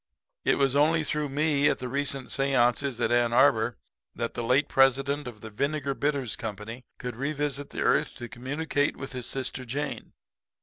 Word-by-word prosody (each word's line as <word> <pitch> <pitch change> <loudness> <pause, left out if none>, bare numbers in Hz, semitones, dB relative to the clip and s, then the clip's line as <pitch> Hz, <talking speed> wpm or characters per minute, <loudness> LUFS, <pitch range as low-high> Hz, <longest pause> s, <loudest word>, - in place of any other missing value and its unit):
It - - +3
was 135 -1 +2
only 155 +2 +4
through 150 -1 -2
me 145 0 +2
at - - +1
the 125 - -5
recent 140 0 -2
seances 135 -1 +2
at 120 - +1
Ann 120 -1 +3
Arbor 120 -4 +4 0.4
that 115 -1 -2
the - - -3
late 125 +5 +3
president 135 +1 +3
of 110 -4 -9
the 110 - -8
Vinegar 140 +4 -1
Bitters 135 -5 -1
Company 110 +3 -6
could 125 -2 -5
revisit 145 +1 -2
the - - -5
earth 150 - +2
to 120 -3 -7
communicate 145 +4 -1
with 135 - -7
his 125 -2 -5
sister 130 -1 -2
Jane. 140 +5 -4
135 Hz, 175 wpm, -27 LUFS, 120-145 Hz, 0.4 s, only